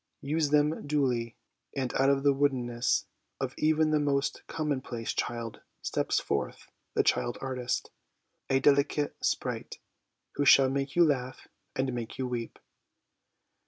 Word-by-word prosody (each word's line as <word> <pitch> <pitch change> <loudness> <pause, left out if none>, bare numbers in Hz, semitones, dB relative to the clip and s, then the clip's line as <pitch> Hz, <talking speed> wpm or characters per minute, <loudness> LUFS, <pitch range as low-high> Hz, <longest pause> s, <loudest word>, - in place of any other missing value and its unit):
Use 150 +1 +1
them 150 +1 +2
duly, 125 -6 0 0.4
and 130 -3 -2
out 135 +1 +3
of 140 0 +2
the 140 -1 +5
woodenness 125 -4 +1 0.3
of - - -2
even 155 0 +3
the 155 - +3
most 140 -1 0
commonplace 130 -7 -3
child 115 -2 -3 0.2
steps - - 0
forth - - -3 0.2
the - - +4
child 120 - +1
artist, 125 -2 -3 0.6
a 135 - +3
delicate 140 +1 +2
sprite, - - -2 0.6
who 145 - +2
shall 135 -1 +7
make 135 0 -2
you 175 0 +6
laugh 130 -4 -2 0.3
and 130 -1 0
make 120 -2 -5
you 130 - -1
weep. 120 -2 -4
135 Hz, 135 wpm, -29 LUFS, 125-145 Hz, 0.6 s, shall